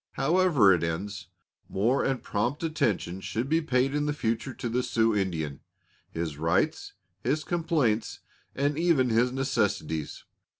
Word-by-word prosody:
However 150 - +4
it 85 - 0
ends, 85 +2 -3 0.4
more 115 +8 +1
and 135 -2 -1
prompt 120 +9 -1
attention 105 - -1
should 110 +7 -3
be 160 +3 +2
paid 135 -3 +1
in 150 0 0
the 150 - 0
future 115 0 -2
to - - -4
the 120 +2 0
Sioux 115 -3 +1
Indian 80 -8 -2 0.5
his 80 -3 -4
rights, 85 - 0 0.3
his 150 +5 0
complaints, 160 -11 0 0.3
and 145 +2 0
even 165 -7 +3
his 120 +3 +3
necessities. 100 - -1
120 Hz, 140 wpm, -27 LUFS, 95-145 Hz, 0.5 s, However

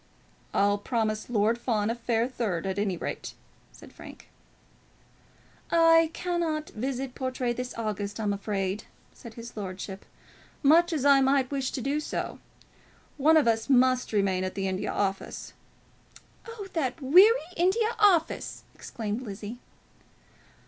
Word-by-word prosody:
"I'll 205 +1 +2
promise 215 -1 -2
Lord 225 0 +1
Fawn 220 -3 0
a - - 0
fair 235 0 0
third, 210 -9 -3
at 190 +1 -2
any 195 -3 -1
rate," - - -5 0.4
said - - -15
Frank. - - -13 1.4
"I 330 -1 +5
cannot 335 -3 -2
visit 255 +3 -4
Portray 255 -2 -2
this 250 +1 -5
August, 205 -2 -3
I'm 210 -2 0
afraid," 200 0 -3 0.3
said 230 -2 -12
his 235 0 -9
lordship, 190 -1 -6 0.6
"much 335 +5 +5
as 295 -4 -1
I 280 -1 +6
might 270 -1 +2
wish 270 -2 -1
to 260 - -3
do 280 +3 0
so. 305 - -4 0.8
One 310 +3 +5
of 300 - +3
us 225 +1 +1
must 255 -1 +3
remain 195 -3 +1
at 185 - -4
the 195 -1 -2
India 190 0 -2
Office 195 -1 -3 0.4
" - - -25
"Oh, 455 -3 -7
that 280 -3 -1
weary 365 - +7 0.2
India 435 +6 +1
Office!" 375 -6 +2
exclaimed 220 0 -5
Lizzie. 215 +1 -7
245 Hz, 140 wpm, -27 LUFS, 205-290 Hz, 1.4 s, weary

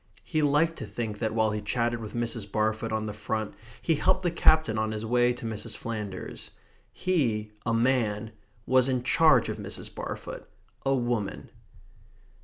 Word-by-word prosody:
He 155 -2 0
liked 150 +3 +3
to - - -6
think 110 -3 -4
that 110 -1 -1
while 110 -1 +3
he 105 0 -2
chatted 120 +2 0
with 110 0 -7
Mrs. 115 -3 -2
Barfoot 110 +1 0
on 110 0 -1
the 105 - -4
front, 110 0 -3 0.3
he 165 - +3
helped 185 +5 +2
the 175 - +2
Captain 155 -9 +4
on 110 0 0
his 110 +1 -4
way 120 +1 +3
to 120 - -8
Mrs. 110 0 -3
Flanders. 105 -5 -5 0.4
He, 115 -13 0 0.2
a 115 - +2
man, 115 -3 +1 0.3
was 130 0 +4
in 125 -2 0
charge 160 +4 +5
of - - -3
Mrs. - - -3
Barfoot, - - -6 0.3
a 135 0 +2
woman. 120 -5 -2
115 Hz, 170 wpm, -28 LUFS, 110-130 Hz, 0.4 s, charge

